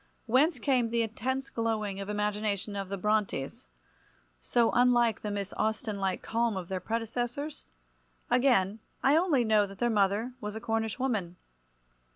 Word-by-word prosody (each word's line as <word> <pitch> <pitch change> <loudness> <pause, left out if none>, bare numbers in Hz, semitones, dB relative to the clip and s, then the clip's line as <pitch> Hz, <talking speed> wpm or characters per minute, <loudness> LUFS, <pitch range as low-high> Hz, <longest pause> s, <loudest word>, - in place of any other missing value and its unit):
Whence 265 +6 +3
came 250 -1 +1
the 235 0 +1
intense 260 +5 -3
glowing 215 -4 -1
imagination 210 0 -2
of 195 -1 -4
the 200 - -3
Brontes—so 135 - -2
unlike 240 -3 +3
the 210 - -3
Miss 200 -1 -3
Austen 215 -1 -1
like 190 -1 -1
calm 230 -2 0
of 180 -2 -6
their 190 -1 -2
predecessors? 240 - -3 0.6
Again, 235 -6 +3 0.2
I 275 +2 +5
only 320 -7 +3
know 215 -2 +3
that 195 0 -11
their 240 +3 +1
mother 210 +4 +1
was 210 0 -4
a - - -3
Cornish 225 0 -1
woman. 215 -10 -1
220 Hz, 145 wpm, -29 LUFS, 200-240 Hz, 0.6 s, I